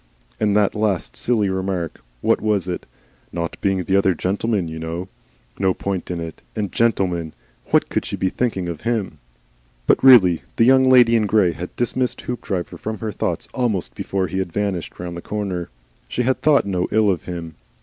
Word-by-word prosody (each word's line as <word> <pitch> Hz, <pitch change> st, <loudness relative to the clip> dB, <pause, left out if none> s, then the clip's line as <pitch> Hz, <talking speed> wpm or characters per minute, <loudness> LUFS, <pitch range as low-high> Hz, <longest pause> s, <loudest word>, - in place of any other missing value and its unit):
And 105 Hz, -1 st, +2 dB
that 105 Hz, -2 st, +3 dB
last 105 Hz, -5 st, -1 dB
silly 110 Hz, -4 st, +1 dB
remark. 95 Hz, -3 st, -2 dB, 0.2 s
What -, -, +2 dB
was 105 Hz, -3 st, +1 dB
it? 90 Hz, -, -4 dB, 0.4 s
'Not 85 Hz, -1 st, -3 dB
being 95 Hz, -2 st, +1 dB
the 95 Hz, +3 st, +1 dB
other 95 Hz, -2 st, +3 dB
gentleman, 100 Hz, +1 st, -1 dB
you 80 Hz, 0 st, -6 dB
know!' 85 Hz, +3 st, -5 dB, 0.5 s
No 95 Hz, -2 st, +2 dB
point 95 Hz, -3 st, -3 dB
in 90 Hz, -1 st, -3 dB
it. 80 Hz, -1 st, -7 dB
And 105 Hz, -3 st, -2 dB
'GENTLEMAN!' 90 Hz, -8 st, 0 dB, 0.3 s
What -, -, +3 dB
COULD -, -, -1 dB
she -, -, -3 dB
be 95 Hz, -, 0 dB
thinking 95 Hz, -7 st, -1 dB
of 85 Hz, -3 st, -5 dB
him? 110 Hz, -10 st, -2 dB, 0.7 s
But -, -, +3 dB
really 95 Hz, -, +7 dB
the 115 Hz, -, +4 dB
Young 130 Hz, +1 st, +6 dB
Lady 120 Hz, -2 st, +6 dB
in 110 Hz, -2 st, +2 dB
Grey 100 Hz, -4 st, +3 dB
had 90 Hz, +2 st, -7 dB
dismissed 125 Hz, +1 st, 0 dB
Hoopdriver 100 Hz, -7 st, -4 dB
from 110 Hz, 0 st, -4 dB
her 110 Hz, +1 st, -4 dB
thoughts -, -, -2 dB
almost 105 Hz, -, -1 dB
before 95 Hz, +7 st, -2 dB
he 95 Hz, +1 st, -3 dB
had 95 Hz, -2 st, -2 dB
vanished 100 Hz, -3 st, -3 dB
round 90 Hz, 0 st, -5 dB
the 85 Hz, -, -6 dB
corner. 95 Hz, -4 st, -3 dB, 0.4 s
She 125 Hz, -, -1 dB
had 130 Hz, +2 st, 0 dB
thought 150 Hz, -6 st, +4 dB
no 90 Hz, -3 st, -1 dB
ill 110 Hz, -2 st, +4 dB
of 90 Hz, -, -3 dB
him. 85 Hz, -2 st, -6 dB
95 Hz, 190 wpm, -21 LUFS, 90-110 Hz, 0.7 s, really